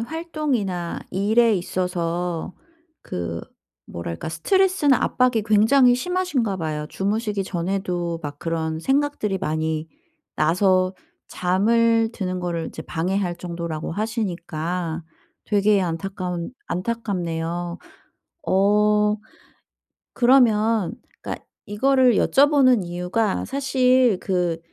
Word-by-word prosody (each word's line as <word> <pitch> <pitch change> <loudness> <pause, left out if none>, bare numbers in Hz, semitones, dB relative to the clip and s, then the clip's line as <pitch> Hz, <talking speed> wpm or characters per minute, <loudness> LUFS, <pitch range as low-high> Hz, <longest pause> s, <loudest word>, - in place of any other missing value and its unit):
활동이나 255 - -3
일에 220 +4 +3
있어서 175 -1 -2 0.5
그 85 -1 -4 0.5
뭐랄까 85 - -6
스트레스나 370 - +2
압박이 250 -3 +2
굉장히 245 +4 +5
심하신가 290 - -1
봐요. 155 -3 -3
주무시기 205 +2 -1
전에도 175 -2 -2
막 145 -1 -6
그런 160 -1 -2
생각들이 270 - 0
많이 160 0 -2 0.5
나서 185 +3 +2 0.3
잠을 225 +5 +2
드는 185 -4 -3
거를 170 -2 -2
이제 - - -8
방해할 180 +1 -2
정도라고 170 -3 -5
하시니까 175 -5 -3 0.4
되게 205 -1 +3
안타까운 180 0 -3 0.2
안타깝네요. 175 -5 -3 0.7
어 210 +2 +3 1.0
그러면 225 -6 +3 0.3
그러니까 - - -6 0.2
이거를 255 +3 +3
여쭤보는 270 -6 +4
이유가 180 +4 -1
사실 255 -5 +2
그 180 -3 0
195 Hz, 240 characters per minute, -23 LUFS, 170-230 Hz, 1.0 s, 굉장히